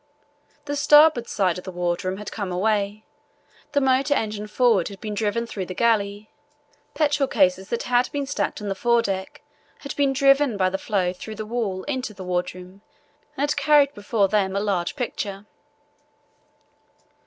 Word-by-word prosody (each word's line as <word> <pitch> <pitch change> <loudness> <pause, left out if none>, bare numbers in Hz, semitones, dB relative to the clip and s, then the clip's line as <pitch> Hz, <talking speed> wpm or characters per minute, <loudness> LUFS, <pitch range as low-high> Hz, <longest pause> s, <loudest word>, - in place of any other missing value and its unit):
The 290 0 -3
starboard 295 -3 +5
side 185 -3 0
of - - -12
the 190 - -7
wardroom 180 +1 -2
had 210 -1 -7
come 200 -4 -4
away. 205 +2 -1 0.7
The 285 - +4
motor 265 +2 +2
engine 210 -3 -3
forward 220 -5 +2
had 200 -1 -9
been 215 -1 -5
driven 215 +2 -1
through 195 -5 -5
the 185 - -6
galley. 210 -2 0 0.6
Petrol 295 -3 +2
cases 190 -4 +1
that 235 - -2
had 245 0 +1
been 285 -1 -2
stacked 275 -5 -3
on - - -4
the 195 - 0
fore 235 +3 +2
deck 190 -3 -4 0.4
had 280 - -6
been 280 -1 +2
driven 275 -3 +3
by 185 -1 +2
the 190 - -2
floe 190 -5 0
through 215 +4 -8
the 215 0 -5
wall 210 -5 -3
into 260 -6 -4
the 190 - -8
wardroom 180 +1 -4 0.6
and 285 +1 0
had - - 0
carried 285 0 +4
before 205 -2 0
them 195 -1 0
a - - +1
large 195 -2 -1
picture. 210 -6 -4
210 Hz, 170 wpm, -23 LUFS, 190-260 Hz, 0.7 s, starboard